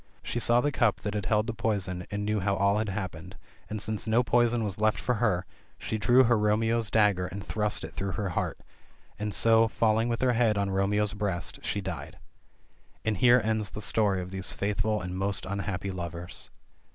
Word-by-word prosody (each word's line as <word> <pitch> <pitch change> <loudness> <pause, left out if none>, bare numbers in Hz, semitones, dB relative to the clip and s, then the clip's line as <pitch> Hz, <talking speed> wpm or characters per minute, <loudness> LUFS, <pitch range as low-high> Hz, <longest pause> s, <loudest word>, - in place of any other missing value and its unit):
She 120 - -2
saw 120 +1 +4
the 145 - 0
cup 120 -6 +1
that 105 - -3
had 105 -3 -2
held 105 +2 +2
the 115 - -3
poison, 100 -5 -2
and 105 0 -3
knew 105 0 0
how 100 +1 0
all 100 +1 +2
had 110 -1 -1
happened, 95 -2 -6 0.3
and 110 - -3
since 110 +1 -3
no 115 +3 +3
poison 120 -1 +2
was 100 -2 -3
left 110 0 +2
for 125 - 0
her, 95 -6 +1 0.3
she 110 - -3
drew 120 +5 +5
her 120 -2 +3
Romeo's 110 +1 +1
dagger 100 -4 +3
and 100 +2 -7
thrust 105 -1 -1
it - - -7
through 95 -1 -3
her 105 -3 -2
heart 85 - -2 0.3
— - - -32
and 105 0 -2
so, 115 +3 +4
falling 110 +1 +1
with 115 - -2
her 125 -1 +3
head 115 -3 +2
on 100 -1 0
her - - -3
Romeo's 105 +2 +1
breast, 100 -4 -3
she 100 - -2
died. 85 -7 -6 0.9
And 110 -2 0
here 120 +4 +6
ends 110 -2 -1
the 105 - -7
story 100 -3 +1
of 90 - -9
these 95 -1 -3
faithful 105 0 -1
and 90 0 -5
most 100 +1 -1
unhappy 100 0 -3
lovers. 85 -1 -6
105 Hz, 210 wpm, -28 LUFS, 95-110 Hz, 0.9 s, here